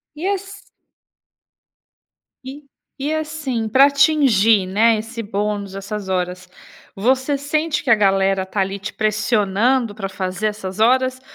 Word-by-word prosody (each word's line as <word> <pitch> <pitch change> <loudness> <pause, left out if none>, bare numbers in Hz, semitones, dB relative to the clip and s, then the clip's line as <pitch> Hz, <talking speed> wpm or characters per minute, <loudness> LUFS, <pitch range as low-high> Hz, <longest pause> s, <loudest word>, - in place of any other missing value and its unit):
E 325 +5 -4
ass 395 0 -5 1.8
E 275 +3 -9 0.4
e 295 +3 -1
assim, 300 -8 -3
pra 265 +5 +6
atingir, 265 - +3
né, 220 +4 +3
esse 230 +1 -6
bônus, 205 -1 -3
essas 195 0 -6
horas, 180 0 -3 0.4
você 260 +7 0
sente 305 +2 -1
que 275 - -5
a 230 - +7
galera 195 -2 +2
tá 190 +2 -5
ali 195 +1 -1
te 200 +2 -6
pressionando 215 +2 0
pra 195 -3 -5
fazer 190 +2 -3
essas 210 -1 -5
horas? 255 +2 +2
220 Hz, 130 wpm, -19 LUFS, 195-265 Hz, 1.8 s, a